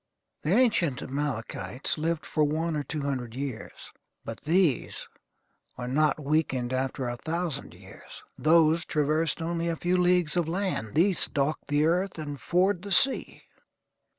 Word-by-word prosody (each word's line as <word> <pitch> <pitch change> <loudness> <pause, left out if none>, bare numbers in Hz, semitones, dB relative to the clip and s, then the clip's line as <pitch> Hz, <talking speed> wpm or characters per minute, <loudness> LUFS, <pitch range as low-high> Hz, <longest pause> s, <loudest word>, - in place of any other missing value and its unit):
The 150 - -3
ancient 205 - +2
Amalekites 135 -2 -3
lived 160 +1 -2
for 155 - 0
one 160 +2 0
or 150 - -1
two 150 +2 -4
hundred 125 -5 -3
years; 135 -4 -6 0.3
but 115 0 -7
these 165 -4 +1 0.7
are 125 0 -5
not 150 +3 +2
weakened 135 -4 0
after 130 0 -2
a 120 0 -4
thousand 160 0 -3
years. - - -13
Those 160 +1 +4
traversed 155 +2 0
only 170 0 -2
a 165 - 0
few 175 +2 0
leagues 180 -3 +3
of 170 -2 0
land; 175 - -2
these 180 +4 +4
stalk 145 +2 +1
the 145 +1 +2
earth 180 +3 0
and 145 -3 -6
ford 180 +1 +1
the 200 +1 -8
sea. 270 +8 +2
155 Hz, 150 wpm, -27 LUFS, 140-170 Hz, 0.7 s, Those